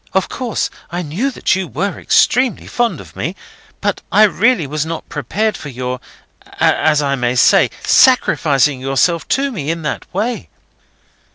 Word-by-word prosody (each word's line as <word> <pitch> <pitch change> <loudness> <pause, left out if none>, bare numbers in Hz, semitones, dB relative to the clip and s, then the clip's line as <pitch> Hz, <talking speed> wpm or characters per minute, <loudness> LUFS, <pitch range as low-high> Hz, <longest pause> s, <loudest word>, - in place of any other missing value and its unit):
Of 190 - +1
course 245 -4 -3 0.2
I 175 0 -3
knew 180 - -2
that 250 - 0
you 190 -1 -3
were 175 - -3
extremely 255 +1 +2
fond 240 -1 -1
of - - -13
me, - - -3 0.5
but - - -1
I 215 - +6
really 215 -2 +3
was 150 +2 -2
not 160 0 -6
prepared 210 - -2
for 150 - -8
your, 125 0 -4 0.6
as 150 -1 +3
I 140 -1 0
may 125 -2 -1
say, 125 - +5
sacrificing 150 - +3
yourself 135 +6 +1
to 275 0 -1
me 155 - -4
in 165 0 -3
that 150 - -4
way." 225 +6 -3
165 Hz, 160 wpm, -17 LUFS, 140-220 Hz, 0.6 s, I